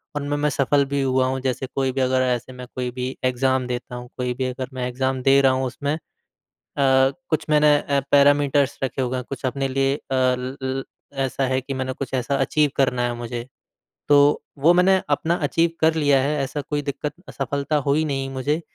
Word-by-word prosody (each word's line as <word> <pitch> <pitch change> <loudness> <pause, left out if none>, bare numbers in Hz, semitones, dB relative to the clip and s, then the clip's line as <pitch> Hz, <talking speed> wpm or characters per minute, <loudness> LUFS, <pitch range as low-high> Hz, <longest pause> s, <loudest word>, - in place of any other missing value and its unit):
उनमें 145 0 -2
मैं 150 +1 +1
सफल 140 +1 +2
भी 140 +1 -1
हुआ 130 -1 +2
हूँ। 130 +1 -1
जैसे 130 0 -2
कोई 135 -1 +1
भी 135 +1 -2
अगर 130 0 +2
ऐसे 125 0 -1
मैं 125 0 -9
कोई 125 -1 -2
भी 125 +1 -4
एग्ज़ाम 130 0 +1
देता 125 0 -5
हूँ 125 0 -8
कोई 125 -1 -1
भी 130 +1 -3
अगर 130 0 -4
मैं 125 -1 -3
एग्ज़ाम 130 +1 -1
दे 135 +1 +5
रहा 135 -1 +5
हूँ 130 0 0
उसमें 140 +3 -2
अ, - - -8 0.8
कुछ 135 +5 +2
मैंने 150 -1 +5
अ, 140 -1 0
पैरामीटर्स 145 -1 +4
रखे 135 0 -2
हुए 130 0 -1
हैं 125 - -4
कुछ 135 - -5
अपने 135 +1 -1
लिए 135 +1 +1
अ, - - -8
ल 130 0 0
ल 130 0 -2 0.4
ऐसा 135 0 -1
है 130 0 +1
कि 135 +2 -5
मैंने 130 0 -3
कुछ 135 -1 -5
ऐसा 130 +1 0
अचीव 150 +2 +2
करना 125 -2 +1
है 120 0 0
मुझे, 120 0 -6 0.6
तो 145 0 +5 0.2
वो 155 +5 +5
मैंने 185 +2 +5
अपना 160 +4 +1
अचीव 165 +3 +2
कर 160 0 +4
लिया 145 -3 +3
है 145 +3 0
ऐसा 140 +2 -3
कोई 145 +1 -3
दिक्क़त 145 +1 -4 0.2
असफलता 140 +2 -2
हुई 145 +3 +2
नहीं 135 -3 -2
मुझे। 140 +4 -1
135 Hz, 210 wpm, -22 LUFS, 130-145 Hz, 0.8 s, दे